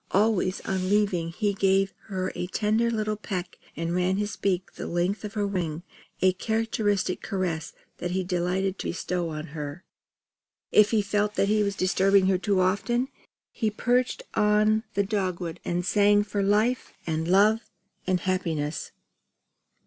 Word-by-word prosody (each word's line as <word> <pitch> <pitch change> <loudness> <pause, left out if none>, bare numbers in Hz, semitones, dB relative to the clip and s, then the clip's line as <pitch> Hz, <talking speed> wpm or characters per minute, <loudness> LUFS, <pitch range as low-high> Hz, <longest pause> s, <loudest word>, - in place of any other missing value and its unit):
Always 195 -2 +2
on 185 -1 -2
leaving 195 -5 +2
he 205 +3 0
gave 195 0 +2
her 185 -3 -2
a 180 - -3
tender 215 +4 +1
little 215 -2 -1
peck 190 -3 -5 0.2
and 165 +1 -2
ran 180 +1 +1
his 210 +1 -2
beak 185 -2 -1
the - - -6
length 175 +5 -1
of 210 -1 -6
her 205 -1 +1
wing 175 -5 -2 0.4
a 185 0 +5
characteristic 210 -2 0
caress 180 -6 -2 0.3
that 175 - -2
he 185 +1 -1
delighted 185 +2 -1
to - - -3
bestow 175 0 -2
on 155 0 -5
her. 150 +3 -6 0.9
If 210 0 +6
he 215 -2 +2
felt 210 +1 0
that 200 - +2
he 215 0 +3
was 200 -1 0
disturbing 195 +1 +3
her 190 -1 +2
too 195 -1 +1
often, 240 +7 +1 0.4
he 220 - 0
perched 245 +4 0
on 215 +1 +3
the 200 - +3
dogwood 185 -4 -2
and 175 0 -1
sang 205 +1 +4
for 205 0 -2
life, 215 +5 +1
and 160 0 -1
love, 210 +5 +4 0.4
and 185 -1 +1
happiness. 165 -5 -2
195 Hz, 155 wpm, -26 LUFS, 180-210 Hz, 0.9 s, If